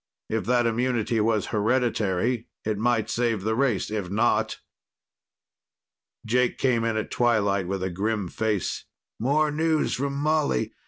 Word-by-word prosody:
If 110 0 -1
that 120 0 +2
immunity 115 -1 0
was 110 -1 +1
hereditary, 115 0 +1 0.2
it 105 -1 -1
might 115 -1 +1
save 115 -4 0
the 110 +2 0
race. 120 -4 0
If 105 -4 -3
not.... 110 +5 +1 1.7
Jake 125 +2 +1
came 120 -4 +1
in 115 -1 0
at 110 - -3
twilight 100 -6 +1
with 95 0 -2
a 95 - -2
grim 105 +2 -1
face. 105 +1 -2 0.3
"More 150 +5 +2
news 160 +1 +1
from 140 +1 -2
Molly. 150 - 0
115 Hz, 140 wpm, -25 LUFS, 105-125 Hz, 1.7 s, that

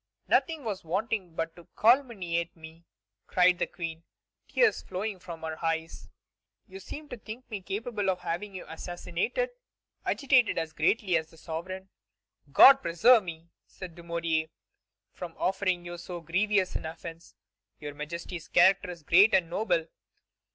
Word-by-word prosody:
"Nothing 320 -3 +2
was 210 -5 -4
wanting 185 0 -2
but 165 0 -3
to 175 - -15
calumniate 210 - +2
me," 160 +1 -13 0.4
cried 180 -1 +4
the - - +1
Queen, 165 -2 -6 0.5
tears 460 -3 +3
flowing 190 +1 -4
from 170 -2 -9
her 160 +1 -5
eyes; 165 0 -2 0.6
"you 190 -1 -10
seem 295 +10 -8
to - - -6
think 225 +3 -9
me 205 -3 -4
capable 205 +1 -2
of 185 -1 -1
having 195 +4 -4
you 185 - -7
assassinated." 175 - -3 0.5
Agitated 260 -4 +3
as 160 -1 -2
greatly 180 +4 +2
as 160 0 -4
the 165 - -18
sovereign, 185 +4 -6 0.6
"God 270 - +9
preserve 225 +6 +5
me," 165 -1 -9 0.2
said 185 -3 -9
Dumouriez, 170 -2 -2 0.6
"from 170 -2 -8
offering 185 -2 0
you 175 0 -7
so 175 0 -6
grievous 185 +3 +1
an - - -3
offence! 165 +1 -9 0.4
Your 145 -1 -6
Majesty's 170 +3 -6
character 190 +2 +4
is 170 -3 -8
great 190 +7 +6
and 170 -3 +1
noble. 175 -5 +1
180 Hz, 145 wpm, -29 LUFS, 165-205 Hz, 0.6 s, God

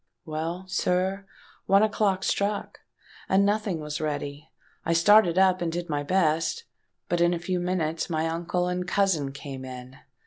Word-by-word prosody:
Well, 165 +3 -4
sir, 190 +1 0 0.4
one 195 +2 +5
o'clock 205 -3 +1
struck; 200 +1 -1 0.5
and 195 +1 +4
nothing 205 -4 0
was 150 0 -4
ready. 145 0 -4 0.3
I 165 - +1
started 180 +1 +5
up, 185 -1 +4
and 170 -1 -1
did 175 +1 -4
my 145 -1 -1
best. 165 - +1 0.4
But 175 -1 0
in 175 0 +3
a - - -2
few 180 +1 -2
minutes 175 -3 -1
my 160 -1 0
uncle 170 +2 -1
and 180 0 -2
cousin 180 -8 +1
came 135 -1 -8
in. 130 0 -9
175 Hz, 160 wpm, -26 LUFS, 155-190 Hz, 0.5 s, one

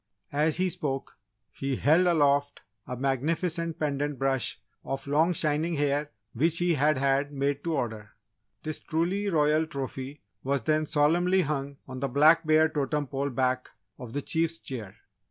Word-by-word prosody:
As 150 +2 +2
he 185 0 +1
spoke, 145 - -4 0.3
he 135 -1 -3
held 160 +8 +4
aloft 145 -4 +2 0.3
a 125 - -5
magnificent 160 +5 -1
pendant 145 -1 -1
brush 135 -3 0 0.2
of 135 0 -4
long 155 +5 +3
shining 155 0 0
hair 145 0 0 0.2
which 160 +7 +2
he 175 0 +2
had 150 0 +2
had 140 +1 +1
made 140 0 -1
to 165 -1 0
order. 110 -6 -4 0.5
This 155 -1 -4
truly 180 +6 -1
royal 155 -1 +2
trophy 135 -1 -6 0.2
was 135 -2 0
then 155 +3 +1
solemnly 170 +5 +3
hung 140 -2 -3
on 130 -1 -7
the 140 - -1
Black 155 +5 +5
Bear 155 0 +5
totem 150 -1 -1
pole 140 +1 -2
back 130 0 0 0.3
of 120 -2 -8
the 145 - -3
Chief's 165 0 +1
chair. 115 -11 -7
145 Hz, 155 wpm, -28 LUFS, 135-160 Hz, 0.5 s, Black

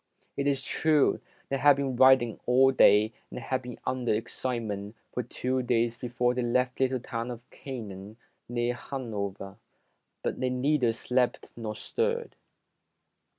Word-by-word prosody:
It 140 0 -1
is 140 -1 +1
true, 155 -3 +2 0.3
they 135 - 0
had 145 0 +6
been 135 -2 -2
riding 130 -3 +5
all 130 +2 +5
day 110 -3 +5 0.2
and - - -6
had 130 +2 -2
been 125 -1 -8
under 125 -1 -1
excitement 110 -2 -3 0.2
for 125 - -1
two 130 +2 -2
days 120 -1 +1
be 125 - -6
fore 125 +1 +1
they 125 - -1
left 125 +1 0
the 135 - +3
little 130 0 -1
town 115 0 -4
of 120 0 -8
Canaan 105 -5 -8 0.3
near 120 0 0
Hanover, 105 -7 -5 0.7
but - - -2
they 130 - 0
neither 125 -1 +2
slept 125 +2 -1
nor 110 -2 -5
stirred. 470 - -2
125 Hz, 150 wpm, -28 LUFS, 115-130 Hz, 0.7 s, had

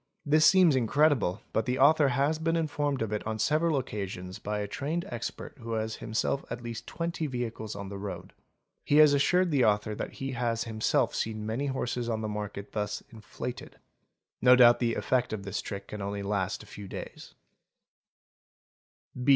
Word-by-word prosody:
This 155 +1 +5
seems 185 -6 +6
incredible 130 - +2
but 110 - 0
the 125 +1 0
author 145 +2 +5
has 140 +5 +1
been 165 +1 +1
informed 145 -5 0
of 105 -1 -3
it 105 - -1
on 110 -1 -2
several 155 +6 +2
occasions 95 -7 -5
by 105 +1 -3
a 105 0 -2
trained 155 +10 -3
expert 120 +4 -6
who 115 -1 -5
has 110 0 -2
himself 115 +5 -1
at 120 - -5
least 115 -1 -6
twenty 170 -2 -3
vehicles 115 -5 -4
on 100 -1 -6
the 100 0 -6
road; 100 0 -7 0.5
he 145 - +1
has 150 -1 +8
assured 180 +5 +3
the 140 -4 +3
author 105 0 +2
that - - -5
he 135 0 -4
has 120 -2 -1
himself 110 -2 +1
seen 110 -1 -3
many 115 +6 -2
horses 125 -3 -2
in 110 -1 -1
the 110 - -2
market 105 -1 -5
thus 105 -1 -3
"inflated". 115 +2 -7 0.6
No 125 +1 +8
doubt 120 -1 +7
the 115 -2 +1
effect 125 -3 0
of 100 -2 -4
this 100 +1 -3
trick 100 -1 -7
can 105 - -6
only 100 0 -3
last 100 -2 -1
a - - -14
few 100 -1 -9
days. - - -9
115 Hz, 180 wpm, -29 LUFS, 105-140 Hz, 0.6 s, has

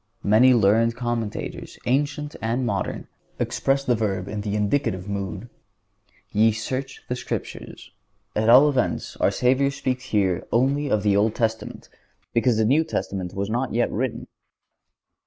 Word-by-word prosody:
Many 120 +5 +5
learned 115 +2 +3
commentators, 120 -3 -4
ancient 145 +3 -1
and 120 +3 -1
modern, 120 - -3 0.3
express 135 0 0
the 125 -3 +2
verb 100 -5 -1
in 105 0 -4
the 100 0 -3
indicative 105 -3 0
mood: 100 +3 -4 0.8
"Ye 110 +1 +4
search 130 +5 -4
the 125 - -2
Scriptures." - - -6 0.4
At 110 +1 +1
all 130 +5 +8
events, 135 -4 -1
our - - +3
Savior 130 +2 +2
speaks 130 -2 -3
here 95 -4 0
only 140 +4 +1
of 105 -4 +1
the 100 -2 +3
Old 105 +2 +2
Testament 110 -1 -3 0.5
because 115 -1 +2
the 110 - +2
New 145 +8 +4
Testament 95 - -4
was 100 +2 -2
not 125 +1 -1
yet 120 - +1
written. 125 +2 -2
115 Hz, 145 wpm, -24 LUFS, 105-130 Hz, 0.8 s, all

